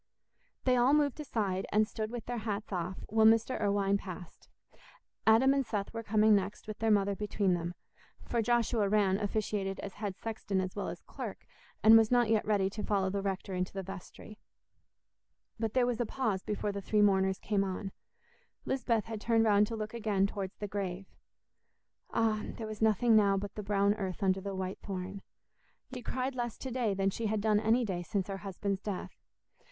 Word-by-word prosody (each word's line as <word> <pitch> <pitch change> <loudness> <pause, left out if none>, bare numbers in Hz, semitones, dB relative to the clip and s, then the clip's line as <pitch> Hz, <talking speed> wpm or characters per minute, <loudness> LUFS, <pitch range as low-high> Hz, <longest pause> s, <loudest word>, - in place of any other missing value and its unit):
They 255 -1 +3
all 250 +4 +5
moved 295 -1 +1
aside, 205 -10 -2
and 215 +1 +3
stood 215 -1 -4
with 240 -1 -6
their 245 -1 -3
hats 210 0 -4
off, 180 +1 -3
while 220 +1 +4
Mr. 225 +2 +3
Irwine 200 -1 +2
passed. 180 -3 -10 0.8
Adam 240 +5 +6
and 275 -1 +1
Seth 205 -4 -3
were 225 - -3
coming 215 0 +4
next, 200 +1 -2
with 215 -1 -6
their 225 - +1
mother 200 -1 +3
between 205 -2 0
them; 175 0 -3 0.5
for 235 - 0
Joshua 230 -3 +2
Rann 200 -2 +3
officiated 205 -2 -2
as 200 - -6
head 200 -3 -5
sexton 215 -3 -3
as 185 -1 -3
well 205 - -3
as - - -7
clerk, - - -7 0.4
and 225 +1 +9
was 220 -1 +2
not 245 -2 +3
yet 220 -2 +3
ready 200 -3 +2
to 210 +1 -5
follow 195 -2 +1
the 200 0 -1
rector 195 -1 -3
into 180 0 -2
the 195 -1 -4
vestry. 195 +3 -10 1.2
But 225 0 -2
there 255 -1 +4
was 245 -1 -1
a - - +1
pause 215 -8 -1
before 210 0 -2
the 200 0 -5
three 210 +1 +2
mourners 190 -1 +3
came 205 -2 0
on: 195 +1 -4 0.7
Lisbeth 235 -5 0
had 225 -2 -6
turned 225 0 +3
round 205 -1 +4
to 230 - -4
look 215 0 -5
again 210 -4 +1
towards 195 -2 -4
the 205 - -4
grave! 195 -2 -4 1.0
Ah! 220 -2 +1
There 225 - -5
was 215 -1 -7
nothing 220 +1 +4
now 200 -2 +5
but 200 0 -4
the 210 - -5
brown 200 0 +2
earth 195 -1 -4
under 190 0 +2
the 200 0 -4
white 190 0 -4
thorn. 190 0 -5 0.7
Yet 255 - -5
she - - -9
cried 255 +2 -2
less 240 -3 -3
to 260 - -6
day 235 -5 0
than 195 0 +1
she 225 +3 -2
had 215 0 0
done 210 0 +3
any 230 +3 +2
day 185 -4 -2
since 195 +1 -2
her 195 - -3
husband's 195 0 -3
death. 200 -4 -4
210 Hz, 200 wpm, -31 LUFS, 195-225 Hz, 1.2 s, and